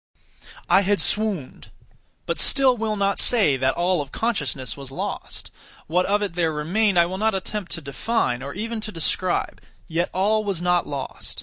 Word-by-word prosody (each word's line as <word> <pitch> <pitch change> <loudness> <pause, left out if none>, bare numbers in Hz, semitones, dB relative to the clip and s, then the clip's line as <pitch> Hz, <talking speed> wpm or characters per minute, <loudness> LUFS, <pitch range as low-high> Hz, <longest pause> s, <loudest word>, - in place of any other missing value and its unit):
I - - +5
had 200 +1 +1
swooned; 205 -11 -2 0.6
but - - -2
still 265 -2 +5
will 220 -2 -1
not 200 -1 +1
say 205 - +4
that 130 0 +1
all 175 -1 +1
of 140 -1 -8
consciousness 145 - -2
was 140 -2 -8
lost. 135 - -6 0.3
What 180 +3 +1
of 205 +1 +2
it 200 - -3
there 165 -2 +1
remained 180 +7 +1
I 170 - +6
will 185 +2 -4
not 220 -1 +2
attempt 190 0 -4
to 165 - -4
define, 140 - -1
or 140 +1 -6
even 225 +2 -3
to 215 - -5
describe; 175 +1 -1 0.3
yet 170 +2 -1
all 215 +3 +1
was 200 -5 -1
not 180 0 +1
lost. 140 -2 -6
185 Hz, 180 wpm, -23 LUFS, 155-215 Hz, 0.6 s, I